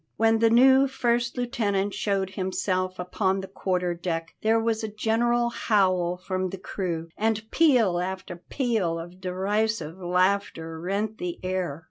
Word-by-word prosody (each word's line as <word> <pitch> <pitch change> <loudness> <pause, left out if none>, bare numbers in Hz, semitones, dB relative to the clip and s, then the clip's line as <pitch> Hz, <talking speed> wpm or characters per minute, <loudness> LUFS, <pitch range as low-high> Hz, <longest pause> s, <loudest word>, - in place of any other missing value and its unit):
When 225 0 +3
the 230 0 +5
new 265 +3 +6
first 240 -2 0
lieutenant 205 -5 0
showed 195 -2 -1
himself 185 -1 -2
upon 190 +2 -1
the 190 - -7
quarter 180 -2 -1
deck 165 -1 -4
there 225 +1 +3
was 225 0 0
a - - -1
general 235 +3 +1
howl 185 -6 +1
from 185 0 -2
the 195 - -6
crew, 170 -3 -4
and 220 0 0
peal 245 - +4
after 185 -1 -4
peal 205 -4 -1
of 175 +3 -9
derisive 190 -1 -1
laughter 180 -2 0
rent 200 +5 -2
the 175 -1 -4
air. 185 -5 -2
195 Hz, 145 wpm, -26 LUFS, 180-225 Hz, -, new